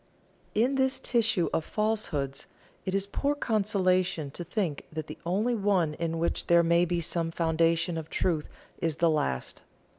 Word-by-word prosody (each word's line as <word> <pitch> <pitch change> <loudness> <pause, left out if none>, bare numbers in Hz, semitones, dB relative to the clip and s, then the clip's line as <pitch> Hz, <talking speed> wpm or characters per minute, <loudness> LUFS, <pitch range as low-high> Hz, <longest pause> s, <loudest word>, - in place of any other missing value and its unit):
In 240 +6 +3
this 265 0 +2
tissue 220 -7 +1
of 160 - +1
falsehoods, 175 -11 -2 0.4
it 190 0 -1
is 195 0 +1
poor 280 +8 -1
consolation 185 - +1
to 175 - -6
think 175 -4 -2
that 155 -1 -4
the 155 0 -9
only 210 +7 +1
one 195 -7 +1
in 165 +1 -2
which 170 +1 -1
there 170 0 +6
may 170 +1 +4
be 175 0 -1
some 165 0 -1
foundation 165 +1 +1
of 160 0 -9
truth 160 -4 0 0.3
is 165 -2 -1
the 165 +1 +3
last. 65 - -1
170 Hz, 160 wpm, -28 LUFS, 160-205 Hz, 0.4 s, there